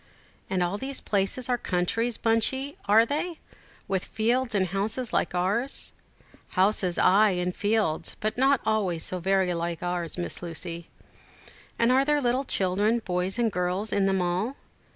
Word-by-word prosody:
"And 185 Hz, -2 st, +1 dB
all 180 Hz, +4 st, -2 dB
these 270 Hz, 0 st, -3 dB
places 200 Hz, +5 st, -1 dB
are 245 Hz, -1 st, 0 dB
countries, 220 Hz, +6 st, -1 dB
Bunchey, 265 Hz, +5 st, +1 dB
are 220 Hz, +3 st, +6 dB
they, 320 Hz, +6 st, -2 dB, 0.5 s
with 190 Hz, -2 st, -1 dB
fields 235 Hz, +1 st, 0 dB
and 190 Hz, -2 st, +2 dB
houses 215 Hz, +6 st, -2 dB
like -, -, 0 dB
ours?" 205 Hz, +9 st, +2 dB, 0.6 s
"Houses, 185 Hz, -2 st, +2 dB
ay, 210 Hz, +3 st, +5 dB
and 180 Hz, 0 st, -2 dB
fields, 205 Hz, -6 st, 0 dB
but 215 Hz, +1 st, -2 dB
not 270 Hz, +1 st, +3 dB
always 195 Hz, -7 st, 0 dB
so 185 Hz, -, -1 dB
very 190 Hz, 0 st, +1 dB
like 170 Hz, 0 st, -3 dB
ours, 175 Hz, -2 st, -3 dB
Miss 175 Hz, -, -4 dB
Lucy." 170 Hz, 0 st, -6 dB, 0.9 s
"And 230 Hz, +1 st, +3 dB
are 265 Hz, +1 st, +4 dB
there 295 Hz, +1 st, +2 dB
little 255 Hz, +1 st, 0 dB
children, 205 Hz, +2 st, +1 dB
boys 180 Hz, +3 st, -1 dB
and 235 Hz, -2 st, +1 dB
girls, 180 Hz, +4 st, -1 dB
in 200 Hz, -1 st, +2 dB
them 190 Hz, -1 st, +1 dB
all?" 185 Hz, +9 st, -1 dB
205 Hz, 155 wpm, -26 LUFS, 180-235 Hz, 0.9 s, are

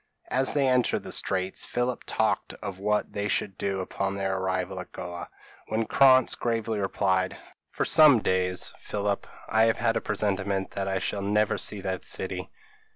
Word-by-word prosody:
As 130 Hz, +2 st, +2 dB
they 140 Hz, -2 st, +3 dB
entered 125 Hz, -1 st, +2 dB
the -, -, -6 dB
Straits, 95 Hz, 0 st, -1 dB
Philip 125 Hz, 0 st, -2 dB
talked -, -, 0 dB
of 100 Hz, -3 st, -7 dB
what 105 Hz, +1 st, 0 dB
they 100 Hz, 0 st, -2 dB
should 100 Hz, -1 st, -1 dB
do 95 Hz, 0 st, -2 dB
upon 95 Hz, +1 st, -3 dB
their 95 Hz, -1 st, -1 dB
arrival 95 Hz, 0 st, -2 dB
at 90 Hz, -, -8 dB
Goa; 85 Hz, 0 st, -7 dB, 0.4 s
when 110 Hz, +1 st, -1 dB
Krantz 130 Hz, +1 st, +5 dB
gravely 115 Hz, -2 st, -1 dB
replied, 95 Hz, -1 st, 0 dB, 0.3 s
"For -, -, -2 dB
some 155 Hz, -5 st, +7 dB
days, 90 Hz, -2 st, -1 dB
Philip, 100 Hz, -1 st, -2 dB, 0.2 s
I 110 Hz, +1 st, +4 dB
have 115 Hz, -, +2 dB
had 115 Hz, -1 st, +1 dB
a -, -, 0 dB
presentiment 100 Hz, -2 st, -1 dB
that 95 Hz, -1 st, -3 dB
I 95 Hz, 0 st, 0 dB
shall 100 Hz, +2 st, -2 dB
never 105 Hz, +1 st, +1 dB
see 105 Hz, -2 st, -2 dB
that 95 Hz, -1 st, -3 dB
city." -, -, -3 dB
100 Hz, 170 wpm, -27 LUFS, 95-115 Hz, 0.4 s, some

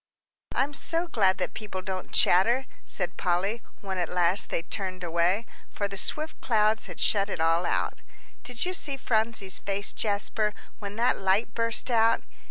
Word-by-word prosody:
"I'm 280 Hz, +2 st, +1 dB
so 330 Hz, +4 st, -1 dB
glad 195 Hz, -, +3 dB
that -, -, -2 dB
people 195 Hz, -4 st, -6 dB
don't 190 Hz, -1 st, -5 dB
chatter," 235 Hz, +9 st, +4 dB, 0.2 s
said 175 Hz, -2 st, -2 dB
Polly, 195 Hz, +6 st, 0 dB, 0.2 s
when 190 Hz, -2 st, -3 dB
at 175 Hz, -, -1 dB
last 180 Hz, +2 st, +2 dB
they 165 Hz, -, -1 dB
turned 185 Hz, 0 st, -3 dB
away, 175 Hz, +6 st, +1 dB, 0.2 s
for 205 Hz, -, -2 dB
the 200 Hz, -, -7 dB
swift 305 Hz, +10 st, -2 dB
clouds 215 Hz, -1 st, +2 dB
had -, -, -9 dB
shut 200 Hz, -1 st, +2 dB
it 185 Hz, -, -3 dB
all 165 Hz, +2 st, +2 dB
out. -, -, -1 dB, 0.4 s
"Did 245 Hz, +3 st, -1 dB
you 365 Hz, -, -1 dB
see 285 Hz, -6 st, -2 dB
Phronsie's 220 Hz, -5 st, +1 dB
face, 200 Hz, 0 st, -2 dB
Jasper, 210 Hz, 0 st, 0 dB, 0.2 s
when 205 Hz, -1 st, -6 dB
that 240 Hz, +3 st, +2 dB
light 195 Hz, +4 st, +2 dB
burst 230 Hz, +2 st, 0 dB
out?" 230 Hz, 0 st, +4 dB
205 Hz, 170 wpm, -27 LUFS, 185-230 Hz, 0.4 s, chatter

